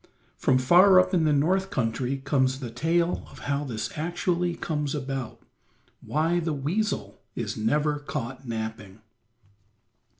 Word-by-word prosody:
From 130 - +2
far 180 +9 +7
up 185 +1 +2
in 170 -3 +3
the 155 - +3
North 185 +7 +2
country 125 - -1
comes 135 -1 +1
the 125 -4 -6
tale 170 +7 0
of - - -14
how 140 0 0
this 115 -6 -4
actually 175 +2 -1
comes 150 -3 -2
about; 135 -3 -5 0.6
why 165 +3 +1
the 165 -2 -1
weasel 175 +10 -2
is - - -3
never 145 +7 +1
caught 135 -3 -5
napping. 110 -3 -5
145 Hz, 135 wpm, -26 LUFS, 130-170 Hz, 0.6 s, far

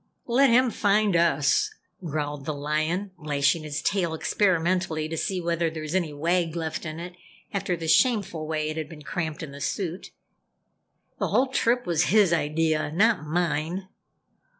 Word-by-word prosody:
"Let 260 +3 +4
him 245 +1 +4
find 205 -2 +2
us," 145 -5 +3 0.3
growled 145 -3 -3
the 155 - -2
Lion, 155 +7 -1
lashing 145 0 +1
his 150 -1 -4
tail 175 -5 0
experimentally 175 -3 +1
to 160 - -4
see 185 +3 -1
whether 170 -1 0
there 160 -1 -6
was 155 +1 -5
any 175 -5 0
wag 165 +3 0
left 160 -1 -3
in 155 +1 -6
it 175 +1 -7 0.4
after 195 -3 -1
the 165 -1 -5
shameful 195 -6 +2
way 155 -1 -1
it 155 - -6
had 155 -2 -4
been 150 -2 -11
cramped 160 -1 -4
in 145 - -7
the 140 0 -10
suit, 180 +3 -3 1.1
"The - - 0
whole 260 +1 +2
trip 245 -1 +1
was 170 -3 +2
his 205 -4 +4
idea 155 -1 0
not 200 -2 +2
mine!" 170 +3 -1
165 Hz, 165 wpm, -26 LUFS, 155-190 Hz, 1.1 s, Let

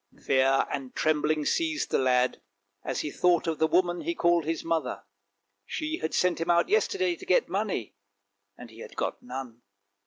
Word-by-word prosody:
Fear 135 0 +3
and 135 -2 -5
trembling 155 -1 +1
seized 320 - 0
the - - +2
lad 125 -1 +2 0.4
as - - -2
he 150 - -4
thought 175 +2 +2
of 165 -1 -2
the 160 - +4
woman 175 0 +1
he 340 0 -2
called 170 - +2
his 165 0 -2
mother. 165 -6 -2 0.6
She 315 +1 -3
had 160 - -2
sent 180 -2 +1
him 165 - -2
out 170 - +3
yesterday 380 -4 +1
to 380 - -13
get 460 +6 +2
money, 195 - -2 0.6
and 120 -2 -11
he 110 - -15
had - - -10
got - - -3
none. 125 -2 -7
165 Hz, 180 wpm, -28 LUFS, 135-200 Hz, 0.6 s, the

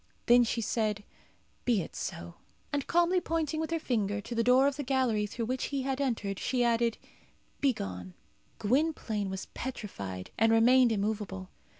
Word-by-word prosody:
Then 245 +1 +7
she 230 0 -1
said, 215 -2 -1 0.6
"Be 225 -7 +2
it - - -11
so." 85 0 -5 0.4
And 285 -2 -1
calmly 345 +2 +3
pointing 320 -2 -1
with 320 - -2
her 330 - 0
finger 210 -9 -1
to 205 - -7
the 230 0 +1
door 250 +3 +5
of 280 -1 +2
the 290 - -4
gallery 250 -6 +1
through 230 +2 -4
which 255 +2 -2
he 275 -2 -2
had 270 +1 -1
entered, 210 -7 -1
she 250 -2 0
added, 235 -1 +2 0.6
"Begone." 95 - -2 0.4
Gwynplaine 225 -5 0
was 190 0 -5
petrified, 100 - -6
and 225 +1 +5
remained 240 +2 +5
immovable. 200 -3 -2
235 Hz, 165 wpm, -30 LUFS, 205-265 Hz, 0.6 s, Then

